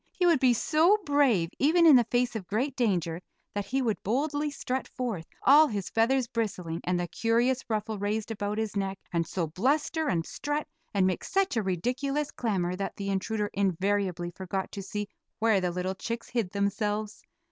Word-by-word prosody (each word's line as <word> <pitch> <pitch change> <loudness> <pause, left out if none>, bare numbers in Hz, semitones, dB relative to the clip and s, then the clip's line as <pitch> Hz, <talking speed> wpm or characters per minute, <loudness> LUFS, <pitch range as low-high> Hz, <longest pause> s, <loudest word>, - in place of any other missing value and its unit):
He 360 - 0
would 335 -5 +5
be 255 -2 +4
so 320 - +4
brave, 255 - +3
even 335 +5 +4
in 310 -4 +9
the 240 -2 +5
face 245 -1 +1
of 195 -5 -5
great 250 +8 -1
danger, 180 - 0 0.3
that 205 -1 -3
he 265 +1 0
would 225 -4 -1
boldly 290 +7 0
strut 260 -2 -3
forth, 220 -10 -4 0.2
all 300 +4 +7
his 205 -7 -4
feathers 250 +3 +2
bristling, 190 -8 -3
and 180 0 +1
the 175 - -2
curious 240 +6 +1
ruffle 215 -1 -2
raised 210 +2 -2
about 205 -1 -3
his 220 -2 -2
neck, 195 -1 -1 0.2
and 165 -1 0
so 175 0 -1
bluster 285 - 0
and 165 - 0
strut 295 +1 -3 0.2
and 195 -2 +2
make 185 -2 0
such 390 -6 0
a 225 - +2
ridiculous 255 - -1
clamor 185 -6 -1
that 195 +1 -4
the 200 -1 -3
intruder 210 +2 -1
invariably 190 -2 0
forgot 190 +1 -4
to 200 - -5
see 205 +1 -4 0.3
where 220 -3 +3
the 180 - 0
little 180 +2 -2
chicks 230 +4 -5
hid 230 -7 -1
themselves. 205 +2 -2
215 Hz, 185 wpm, -28 LUFS, 190-260 Hz, 0.3 s, in